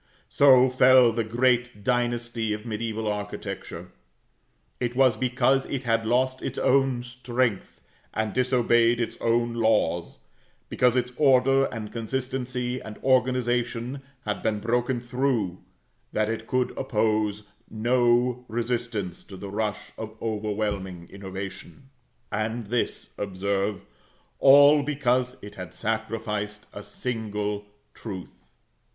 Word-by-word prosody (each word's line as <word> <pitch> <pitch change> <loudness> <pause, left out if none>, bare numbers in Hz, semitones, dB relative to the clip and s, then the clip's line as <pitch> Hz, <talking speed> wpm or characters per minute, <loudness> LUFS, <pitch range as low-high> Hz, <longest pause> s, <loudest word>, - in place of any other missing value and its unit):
So 130 -2 +6
fell 130 -1 +6
the 115 0 -1
great 120 -1 +1
dynasty 120 -2 0
of 105 - -4
mediæval 110 -1 -3
architecture. 105 -1 -5 0.9
It 120 -1 -2
was 130 -3 +4
because 130 +3 +1
it 135 -2 -3
had 115 -2 +1
lost 130 +2 +1
its 130 - -4
own 135 -2 +2
strength, 120 - -2 0.3
and 110 -1 -2
disobeyed 120 -2 +3
its 115 - -2
own 120 0 +1
laws 110 -7 +1 0.5
because 125 -1 +2
its 125 0 0
order, 135 -1 +4
and 110 -4 -6
consistency, 125 +1 -3
and 105 -1 -9
organization, 125 0 +1 0.2
had 105 -1 -2
been 105 -1 0
broken 120 +3 0
through 120 -7 -1 0.5
that 110 0 +1
it 115 0 -4
could 125 -1 0
oppose 105 -3 0 0.2
no 120 +2 +2
resistance 115 -5 -3
to 95 - -10
the 100 +1 -7
rush 105 0 -3
of 110 0 -7
overwhelming 105 -5 -3
innovation. 100 +7 -8 0.4
And 110 +2 -2
this, 120 +3 -2
observe, 100 0 -2 0.5
all 145 +2 +7
because 130 -3 0
it 100 - -9
had 90 -2 -9
sacrificed 110 -1 -3
a 100 - -7
single 105 -1 -4 0.3
truth. 95 - -9
115 Hz, 115 wpm, -26 LUFS, 105-125 Hz, 0.9 s, all